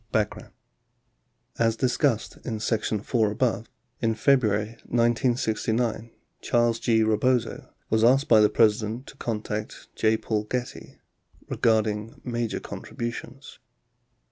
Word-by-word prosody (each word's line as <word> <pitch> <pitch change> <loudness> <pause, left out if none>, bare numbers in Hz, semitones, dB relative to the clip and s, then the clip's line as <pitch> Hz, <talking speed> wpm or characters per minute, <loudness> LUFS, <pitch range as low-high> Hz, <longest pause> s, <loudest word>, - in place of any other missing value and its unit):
Background 105 -1 -2 1.1
As 115 -1 +2
discussed 125 -1 0
in 110 -3 -4
section 110 -1 -1
IY 110 -2 +1
above, 115 0 -1 0.3
in 115 -1 +1
February 110 -4 +2 0.2
1969, 115 -1 0 0.3
Charles 120 -1 +1
G. 110 -1 +2
Rebozo 110 +3 0 0.2
was 110 0 +3
asked 135 +4 +4
by 110 -2 +6
the 105 - +5
President 110 +2 +1
to - - -13
contact 105 -2 -4
J. 110 0 +2
Paul 105 -1 -2
Getty 125 +3 -5 0.5
"regarding 110 -1 0
major 120 -2 -2
contributions." 120 0 -7
115 Hz, 110 wpm, -26 LUFS, 110-120 Hz, 1.1 s, by